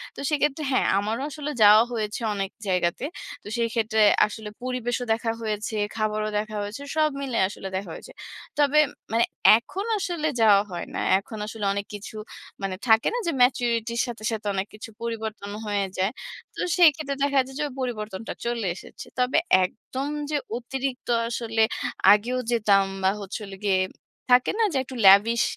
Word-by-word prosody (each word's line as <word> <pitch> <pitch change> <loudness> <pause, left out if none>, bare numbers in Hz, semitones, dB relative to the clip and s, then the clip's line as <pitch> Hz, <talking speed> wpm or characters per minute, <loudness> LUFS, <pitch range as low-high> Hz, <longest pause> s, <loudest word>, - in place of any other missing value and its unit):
তো - - -10
সেক্ষেত্রে 300 0 0
হ্যাঁ, 255 - +2
আমারও 215 +5 -1
আসলে 295 +1 -5
যাওয়া 210 +2 +8
হয়েছে 215 0 -3
অনেক 195 -1 -3 0.2
জায়গাতে। 180 +6 0 0.4
তো - - -11
সেই 230 -1 +1
ক্ষেত্রে 220 -1 +1 0.3
আসলে 215 0 -8
পরিবেশও 245 -1 -2
দেখা 225 0 -1
হয়েছে। 215 0 -3 0.2
খাবারও 215 -1 -1
দেখা 215 0 -5
হয়েছে। 205 +7 -6
সব 310 -1 +3
মিলে 260 -4 -2
আসলে 195 -1 -8
দেখা 190 -1 -4
হয়েছে। - - -10 0.5
তবে 290 +1 +4 0.3
মানে 230 +1 +3 0.3
এখন 375 - -6
আসলে 345 -5 -2
যাওয়া 205 -2 +6
হয় 175 - -4
না। - - -2 0.2
এখন 215 +2 -10
আসলে 215 -1 -5
অনেক 200 0 -3
কিছু 205 +2 -9 0.5
মানে 195 -1 -2
থাকে 220 0 +5
না - - 0
যে, - - +2
ম্যাচুরিটির 235 -2 +2
সাথে, 235 -2 -7
সাথে 215 -1 -4
অনেক 195 +1 -2
কিছু 215 +1 -9
পরিবর্তন 220 -3 -4
হয়ে 205 -1 0
যায়। 190 +2 +1 0.4
তো - - -4 0.2
সেই 345 -3 +9
ক্ষেত্রে 280 -3 -4
দেখা 280 -1 +3
যায় 265 - -11
যে, - - 0 0.2
পরিবর্তনটা 220 -5 -4
চলে 235 -3 -1
এসেছে। - - -11
তবে 250 +1 +2 0.3
একদম 260 +8 -6 0.2
যে 300 - +1 0.2
অতিরিক্ত 260 +1 -4 0.2
আসলে, 225 -1 -1 0.5
আগেও 245 +5 0
যেতাম 205 -4 +4 0.2
বা 190 - +5
হচ্ছে 200 +2 -5
হলো 195 -1 -9
গিয়ে, 190 -2 +3 0.5
থাকে 250 - +5
না 455 - +4
যে, 275 - +1
একটু 260 - -10
লেভিশ 215 +4 +6
225 Hz, 170 wpm, -25 LUFS, 205-255 Hz, 0.5 s, সেই